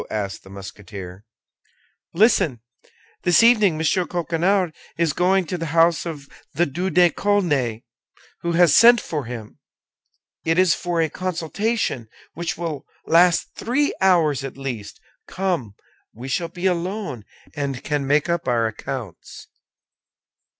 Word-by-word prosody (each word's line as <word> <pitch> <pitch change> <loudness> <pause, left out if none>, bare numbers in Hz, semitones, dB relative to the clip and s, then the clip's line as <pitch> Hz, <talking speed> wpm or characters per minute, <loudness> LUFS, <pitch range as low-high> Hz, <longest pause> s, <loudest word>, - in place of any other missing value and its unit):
asked 100 -2 -4
the 95 - -15
Musketeer. 100 0 -10 0.9
"Listen. 185 - +3 0.6
This 175 +5 +4
evening 215 -7 +5
M. 155 - -4 0.3
Coquenard 175 +1 0 0.2
is 165 -3 +1
going 185 +3 +2
to 180 +2 -4
the 165 - -3
house 165 +1 +4
of 145 -4 -7 0.3
the 170 +4 +3
Duc 175 +5 -3
de 175 0 +5
Chaulnes, 145 - 0 0.6
who 170 0 -1
has 170 -2 +5
sent 235 +2 +8
for 150 -9 -4
him. 115 -3 -8 0.8
It 165 +1 +1
is 185 -2 +5
for 175 -2 -1
a - - +1
consultation, 185 - -2 0.3
which 170 +1 -4
will 160 -5 -5 0.2
last 170 +1 +3
three 280 +6 0
hours 165 -8 +3
at 135 -1 -7
least. 120 -7 -6 0.3
Come! 170 - -2 0.4
We 120 +4 -8
shall 165 +6 -1
be 180 +2 -6
alone, 180 - -2 0.3
and 140 -3 -3
can 145 -2 -2
make 145 +1 +2
up 170 -3 -1
our 120 -2 +2
accounts." 110 -2 -7
165 Hz, 135 wpm, -22 LUFS, 130-180 Hz, 0.9 s, sent